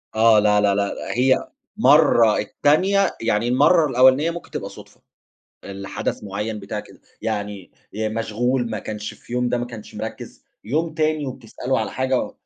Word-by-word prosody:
آه، 110 Hz, -1 st, +6 dB
لا، 105 Hz, 0 st, +3 dB
لا، 100 Hz, -1 st, +2 dB
لا، 100 Hz, 0 st, 0 dB, 0.2 s
هي 130 Hz, +1 st, +2 dB, 0.3 s
مرّة، 140 Hz, -, +5 dB
التانية 185 Hz, -, +2 dB
يعني 115 Hz, 0 st, 0 dB
المرّة 145 Hz, +6 st, +4 dB
الأولانية 130 Hz, +6 st, +4 dB
ممكن 170 Hz, -, -9 dB
تبقى -, -, -5 dB
صدفة، -, -, -15 dB, 0.6 s
الحدث 100 Hz, +1 st, -5 dB
معيّن 105 Hz, +2 st, -4 dB
بتاع 100 Hz, +1 st, -5 dB
كده، -, -, -14 dB, 0.2 s
يعني 105 Hz, -3 st, -4 dB, 0.2 s
آآ، 110 Hz, 0 st, -1 dB
مشغول 115 Hz, +3 st, -1 dB
ما 105 Hz, -2 st, -3 dB
كانش 105 Hz, 0 st, -6 dB
في 120 Hz, -, -12 dB
يوم 125 Hz, 0 st, 0 dB
ده 125 Hz, -, 0 dB
ما 120 Hz, -, -3 dB
كانش 115 Hz, -3 st, -11 dB
مركز، -, -, -7 dB, 0.2 s
يوم 155 Hz, +7 st, -1 dB
تاني 155 Hz, -2 st, 0 dB
وبتسأله 130 Hz, 0 st, -3 dB
على 110 Hz, -, -3 dB
حاجة 130 Hz, 0 st, -1 dB
120 Hz, 160 wpm, -22 LUFS, 105-135 Hz, 0.6 s, آه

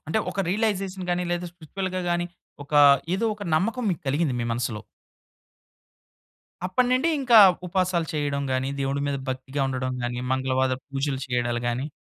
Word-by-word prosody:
అంటే 220 Hz, -, +1 dB
ఒక 195 Hz, -, -2 dB
రియలైజేషన్ 195 Hz, -2 st, -1 dB
గాని, 175 Hz, 0 st, 0 dB
లేదా 175 Hz, 0 st, -2 dB
స్పిరిచ్యువల్‌గా 185 Hz, +3 st, -4 dB
గాని, 175 Hz, 0 st, 0 dB, 0.4 s
ఒక 145 Hz, -, -15 dB, 0.4 s
ఏదోక 215 Hz, 0 st, -1 dB
నమ్మకం 225 Hz, +10 st, 0 dB
మీకలిగింది 150 Hz, -4 st, -1 dB
మీ -, -, -1 dB
మనసులో. 115 Hz, -2 st, -2 dB, 1.9 s
అప్పటినిండి 255 Hz, -, +2 dB
ఇంకా 240 Hz, -4 st, +6 dB, 0.3 s
ఉపాసాలు 180 Hz, -2 st, 0 dB
చేయడం 145 Hz, -2 st, -1 dB
గాని, 130 Hz, +1 st, 0 dB
దేవుడి 135 Hz, +1 st, -1 dB
మీద 140 Hz, -1 st, -1 dB
భక్తిగా 130 Hz, +2 st, -3 dB
ఉండడం 130 Hz, -1 st, -2 dB
గాని, 120 Hz, 0 st, -3 dB
మంగళవాదా 130 Hz, 0 st, +1 dB
పూజలు 135 Hz, -1 st, -2 dB
చేయడాలు 120 Hz, -1 st, -1 dB
గాని 125 Hz, +4 st, -2 dB
150 Hz, 135 wpm, -25 LUFS, 130-185 Hz, 1.9 s, ఇంకా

